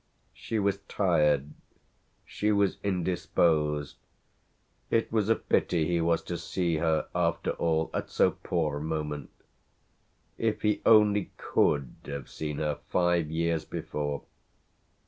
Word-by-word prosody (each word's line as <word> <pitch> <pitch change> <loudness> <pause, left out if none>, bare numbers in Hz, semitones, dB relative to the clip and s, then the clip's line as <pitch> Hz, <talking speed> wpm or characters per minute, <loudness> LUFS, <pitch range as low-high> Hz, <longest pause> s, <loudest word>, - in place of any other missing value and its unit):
She 115 - -4
was 100 -1 +1
tired, 75 -7 +2 0.7
she 105 +1 -1
was 100 -2 +2
indisposed: 80 -5 0 0.9
it 115 - +1
was 110 -2 +1
a 115 - +5
pity 85 -3 +1
he 85 0 +1
was 85 0 +1
to 85 -2 -4
see 85 -1 -1
her 80 -1 +1
after - - 0
all 80 -1 0
at - - -3
so - - +3
poor 80 -4 -2
a - - -7
moment. 75 -2 -3 1.1
If 110 -1 -1
he 105 -1 +1
only 105 -2 +5
could 70 -4 +1
have 70 -1 -6
seen 75 -2 -4
her 75 -2 -1
five 85 -3 +2
years 80 0 0
before! 75 -2 -4
85 Hz, 125 wpm, -28 LUFS, 75-100 Hz, 1.1 s, a